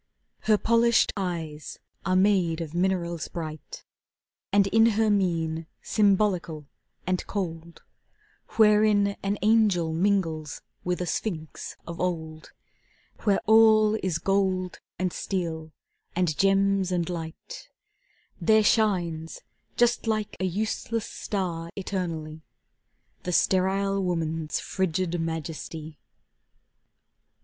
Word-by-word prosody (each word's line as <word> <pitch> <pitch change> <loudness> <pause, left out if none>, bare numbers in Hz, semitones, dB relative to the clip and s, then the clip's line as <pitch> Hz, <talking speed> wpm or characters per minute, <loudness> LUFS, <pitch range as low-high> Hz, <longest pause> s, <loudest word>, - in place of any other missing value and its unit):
Her 215 - +6
polished 230 +1 +3
eyes 165 -6 -4 0.3
are 185 - +2
made 185 -4 +3
of 165 -2 -5
minerals 175 -2 -1
bright, 155 -3 -7 0.7
And 200 0 +4
in 225 +3 +4
her 220 -1 +3
mien, 165 -5 0 0.2
symbolical 195 -7 +1 0.4
and 185 0 0
cold, 170 -4 -5 0.7
Wherein 210 -2 +5
an 200 +1 -1
angel 205 -7 +3
mingles 165 -4 0 0.2
with 180 0 -1
a - - -1
sphinx 160 -3 -4
of 170 0 -7
old, 160 -3 -3 0.7
Where 200 -2 +3
all 220 -1 +6
is 180 -4 0
gold, 185 0 0 0.2
and 185 -2 -1
steel, 165 -4 -3 0.4
and 175 -3 +1
gems, 195 0 +2
and 175 -2 0
light, 175 - -7 0.7
There 220 -1 +4
shines, 175 -8 +1 0.4
just 240 -1 +2
like 215 -1 -1
a 190 - 0
useless 220 +4 -2
star 170 -5 -4
eternally, 165 -5 -4 0.8
The 180 - -3
sterile 195 +2 +2
woman's 165 -3 -2
frigid 180 -1 -1
majesty. 160 -1 -5
185 Hz, 105 wpm, -26 LUFS, 165-205 Hz, 0.8 s, Her